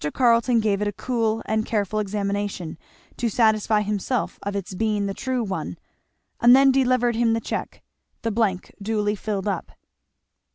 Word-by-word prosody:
Carleton 235 -1 +4
gave 205 -2 +1
it 210 - +1
a - - 0
cool 225 -2 -1
and 220 0 0
careful 215 -1 -1
examination, 200 -4 -2 0.4
to 240 - 0
satisfy 215 -1 +3
himself 210 +4 -2
of 200 0 -4
its 195 -1 -4
being 210 +1 0
the 195 - -2
true 255 +2 -2
one; 195 -3 -4 0.6
and 240 +1 +7
then 270 0 +6
delivered 255 -3 +2
him 230 0 +2
the 225 - +1
cheque; - - -5 0.4
the 230 - 0
blank 200 -4 -1
duly 210 0 0
filled 205 -1 -3
up. 195 -4 -3
215 Hz, 160 wpm, -24 LUFS, 200-235 Hz, 0.6 s, and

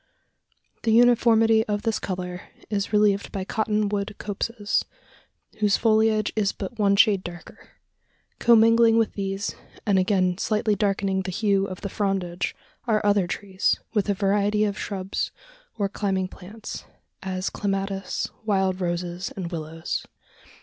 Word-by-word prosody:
The 225 - +1
uniformity 225 -2 +5
of 205 -1 -1
this 225 -2 0
colour 180 -1 -4 0.3
is 200 0 -1
relieved 210 -2 +2
by 195 - -3
cotton 215 0 0
wood 205 0 -2
copses, 210 +1 -1 0.8
whose 210 -1 +3
foliage 220 -1 +2
is 205 -2 +1
but 210 +3 -7
one 200 -1 +4
shade 200 -2 +4
darker. 175 -1 -10 0.7
Commingling 230 0 +6
with 225 -1 +2
these, 195 +1 -3 0.3
and 200 -3 +3
again 185 -1 +1
slightly 215 0 +1
darkening 195 -1 0
the 190 - -5
hue 195 0 +1
of 185 -2 -7
the - - -3
frondage, 195 -3 -2 0.3
are 215 -2 +1
other 200 -3 +3
trees, 190 0 0
with 210 -2 +1
a 200 - +2
variety 205 +2 +2
of 205 -2 0
shrubs 195 -2 -3 0.5
or 200 -2 +1
climbing 195 -2 -1
plants 205 +5 -9 0.4
as 185 0 -3
clematis, 195 -1 -2 0.2
wild 190 -3 +1
roses, 175 +1 -3
and 185 -3 -5
willows. 160 -1 -4
200 Hz, 135 wpm, -25 LUFS, 190-215 Hz, 0.8 s, Commingling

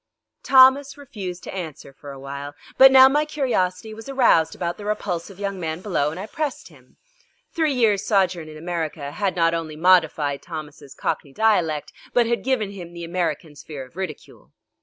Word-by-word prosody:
Thomas 270 +2 +5
refused 200 -10 -7
to - - -8
answer 160 -7 -7
for 145 +1 -12
a 135 - -9
while, 140 +1 -7 0.2
but 265 0 +8
now 265 0 +9
my 295 +3 +2
curiosity 225 -9 -1
was 225 +4 -10
aroused 230 -12 +3
about 170 -1 -3
the 205 - -9
repulsive 195 -3 -3
young 200 -1 -3
man 160 -1 -3
below 175 -7 0
and 160 +4 -7
I 195 - -5
pressed 300 +4 -4
him. - - -22 0.6
Three 315 -5 +1
years' 215 -5 +2
sojourn 185 -5 +1
in 155 - -10
America 160 -3 -4
had 195 +4 -2
not 165 -1 +2
only 165 -2 -4
modified 160 -4 +2
Thomas' 150 -4 -9
cockney 140 - -3
dialect 175 -8 +1 0.2
but 240 -1 +4
had 235 +1 -1
given 245 -6 0
him 175 -4 -10
the 170 0 -8
American's 165 -3 -3
fear 145 -4 -8
of 130 - -22
ridicule. 190 0 -8
180 Hz, 180 wpm, -23 LUFS, 160-225 Hz, 0.6 s, now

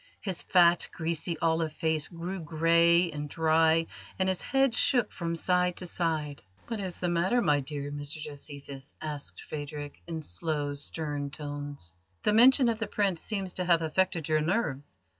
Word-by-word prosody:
His 190 -5 -2
fat, 175 -1 +4
greasy, 165 0 -1
olive 160 -1 +1
face 160 -1 0
grew 175 +3 -5
grey 170 +2 +3
and 150 -1 -5
dry, 160 +1 +3 0.3
and 190 - +1
his 185 - +1
head 270 -2 +2
shook 255 -5 +2
from 170 -1 -3
side 180 +1 +1
to 185 - -2
side. 155 -5 -2 0.3
"What 230 -2 -3
is 185 -3 -4
the 180 - -2
matter, 175 +7 +2
my 150 -10 +3
dear 145 +1 -5
Mr 145 0 -2
Josephus?" 140 -2 -7
asked 150 -2 -5
Phadrig, 145 -1 -7
in 165 -2 -4
slow, 145 - -2
stern 145 0 -3
tones. 145 - -6 0.3
"The 210 - +3
mention 255 +3 +6
of 230 -1 0
the 220 - -2
Prince 195 -5 0
seems 195 -4 -3
to 180 - -3
have 170 -2 +3
affected 165 0 0
your 155 -1 +2
nerves. 150 - -1
165 Hz, 165 wpm, -29 LUFS, 145-180 Hz, 0.3 s, mention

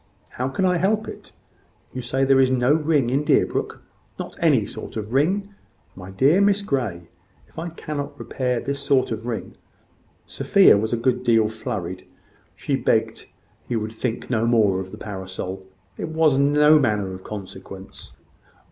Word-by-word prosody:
"How 125 - -3
can 160 +8 -1
I 180 -1 +3
help 215 +5 +1
it? - - -10 0.6
You 130 - -4
say 130 +3 0
there 135 0 +4
is 130 -1 +4
no 130 +2 +3
ring 150 -5 +1
in 140 +3 +1
Deerbrook. - - 0 0.3
Not - - -7
any - - +3
sort - - -8
of 110 +2 -5
ring? 195 +9 +1 0.4
My 95 0 -10
dear 140 - +3
Miss 200 0 +3
Grey, 110 - -2 0.4
if - - -11
I 170 +1 -4
cannot 145 -3 -6
repair 125 -4 -2
this 140 +2 -3
sort 140 -3 +1
of 110 +1 -4
ring 115 -2 -4 0.4
" - - -37
Sophia - - +6
was 110 +2 -1
a 120 - +1
good 125 +1 0
deal 115 -3 +3
flurried. 95 -5 -5 0.5
She - - -1
begged - - 0 0.4
he 120 - -2
would 110 -1 -2
think 115 +1 -4
no 115 -2 0
more 105 -5 +3
of 95 0 -7
the - - -9
parasol; 95 -1 -6 0.3
it - - -3
was 160 -3 +3
no 150 +2 +5
manner 105 -7 0
of 95 0 -9
consequence. 95 -1 -10
125 Hz, 170 wpm, -23 LUFS, 105-145 Hz, 0.6 s, Sophia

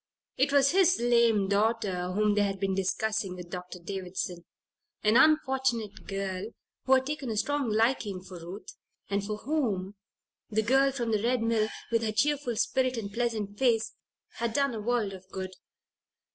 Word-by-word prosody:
It 275 +2 +2
was 275 -1 +5
his 370 0 +4
lame 235 -4 +3
daughter 200 -3 0
whom 210 +1 +2
they 205 - +2
had 195 -1 -1
been 195 0 0
discussing 195 0 -1
with 175 -1 -10
Dr. 180 0 -6
Davison 180 -1 -5 0.6
an 215 +1 +4
unfortunate 265 -6 +2
girl 195 -1 -3 0.4
who 265 - +4
had 260 0 +4
taken 290 -3 -4
a 220 - -2
strong 285 +1 0
liking 215 -3 +1
for 185 -2 -10
Ruth, 175 +5 -9 0.4
and 200 0 0
for 210 +1 -3
whom 215 -9 -1 0.6
the 220 0 +1
girl 270 +4 +4
from 240 -4 -2
the 215 -2 +1
Red 240 +1 +1
Mill, 225 -1 +1 0.2
with 230 -1 +2
her 220 -1 0
cheerful 270 +2 +1
spirit 255 +3 +1
and 200 -3 -5
pleasant 215 -4 -2
face, 230 -4 +2 0.4
had 235 -1 -1
done 275 0 +1
a 220 - -4
world 225 -3 0
of 190 -1 -10
good. 190 -1 -5
220 Hz, 170 wpm, -29 LUFS, 195-250 Hz, 0.6 s, was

